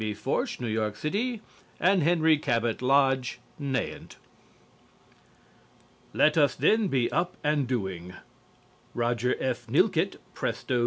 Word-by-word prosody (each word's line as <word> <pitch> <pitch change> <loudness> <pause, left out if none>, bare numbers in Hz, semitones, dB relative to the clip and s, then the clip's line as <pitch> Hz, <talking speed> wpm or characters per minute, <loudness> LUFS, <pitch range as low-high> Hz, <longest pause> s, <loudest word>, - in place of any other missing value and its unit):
Forsch, 180 - -2
New 125 - -4
York 110 -2 -1
City, 215 - -2 0.4
and 185 +1 +3
Henry 160 0 +4
Cabot 115 -6 -1
Lodge, 135 -2 +2 0.2
Nahant. 135 -2 -3 2.0
"LET 150 0 +3
US 145 -4 +4
THEN 210 - +3
BE 130 -8 0
UP 175 +1 -1
AND 145 -3 +1
DOING" 95 -7 -4 0.8
Roger 120 +1 0
F. 130 -2 -3
Nilkette, - - +2 0.2
Presto, 125 - -2
N. - - +1
135 Hz, 115 wpm, -27 LUFS, 120-160 Hz, 2.0 s, Henry